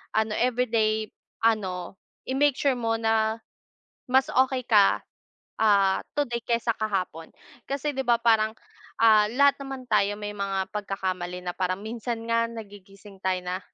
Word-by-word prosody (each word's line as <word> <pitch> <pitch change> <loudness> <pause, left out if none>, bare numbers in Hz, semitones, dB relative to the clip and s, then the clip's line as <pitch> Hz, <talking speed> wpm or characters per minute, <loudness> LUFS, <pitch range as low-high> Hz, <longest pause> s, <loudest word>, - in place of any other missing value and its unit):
ano 220 0 +1
everyday 225 -3 +1 0.3
ano 195 -5 0 0.3
i-make 275 +1 +3
sure 270 -2 +1
mo 225 -1 0
na 220 0 +1 0.7
mas 265 +1 +4
okay 260 0 +2
ka. 205 -3 +5 0.6
Ah, 200 -3 +4 0.2
today 240 -5 0
kaysa 235 0 0
kahapon 185 -6 -3 0.4
kasi 280 +2 -1
di 265 - 0
ba 235 -1 +3
parang, 220 -2 +3 0.5
ah, 215 -2 +6
lahat 280 +2 +4
naman 270 -2 -7
tayo 205 -2 +3
may 205 - -4
mga 195 -1 -2
pagkakamali 185 -3 -3
na 180 - -3
parang 185 +1 -1
minsan 230 +1 -4
nga 230 0 +3
nagigising 200 -2 -12
tayo 185 -1 0
na 180 +1 -2
220 Hz, 140 wpm, -26 LUFS, 195-240 Hz, 0.7 s, ah